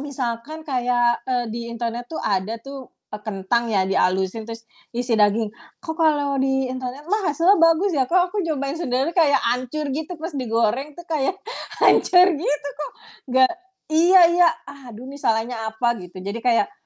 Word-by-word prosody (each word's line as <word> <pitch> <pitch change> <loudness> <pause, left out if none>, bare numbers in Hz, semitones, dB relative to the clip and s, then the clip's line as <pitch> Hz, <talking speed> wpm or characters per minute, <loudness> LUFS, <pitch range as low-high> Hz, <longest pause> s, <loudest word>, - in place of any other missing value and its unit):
misalkan 275 +4 -5
kayak, 245 -3 +1
eee, 245 -1 0
di 235 - -4
internet 235 +1 -4
tuh 320 - -5
ada 200 +3 -1
tuh 270 +1 -10 0.2
e 210 - -4
kentang 215 +3 -1
ya 195 -4 +2
di 195 - -2
halusin 190 +4 0
terus 230 0 -8 0.3
isi 245 0 -1
daging. 210 +1 +2 0.3
Kok 320 - -4
kalau 290 -4 +2
di 265 0 +1
internet 255 +3 -6
mah 420 -3 +1
hasilnya 335 +6 +3
bagus 330 +3 +4
ya, 265 -4 +1
kok 360 0 +2
aku 420 - -1
nyobain 285 -5 -2
sendirian 285 -1 -1
kayak 315 -5 +4
ancur 255 +5 -3
gitu, 315 +5 -4
pas 325 +3 -6
digoreng 250 +2 -1
tuh 345 - -10
kayak 315 +2 -1 0.5
hancur 360 0 +6
gitu, 290 -1 -2
kok 300 - -4 0.5
gak 260 +4 +5 0.4
iya 350 +4 +6
iya, 350 -1 +5 0.4
aduh, 235 +2 -10
nih 280 +1 -9
salahnya 225 0 -1
apa, 235 +2 0
gitu. 180 +1 -12
Jadi 200 +4 -4
kayak, 250 - +1
260 Hz, 170 wpm, -22 LUFS, 230-315 Hz, 0.5 s, hancur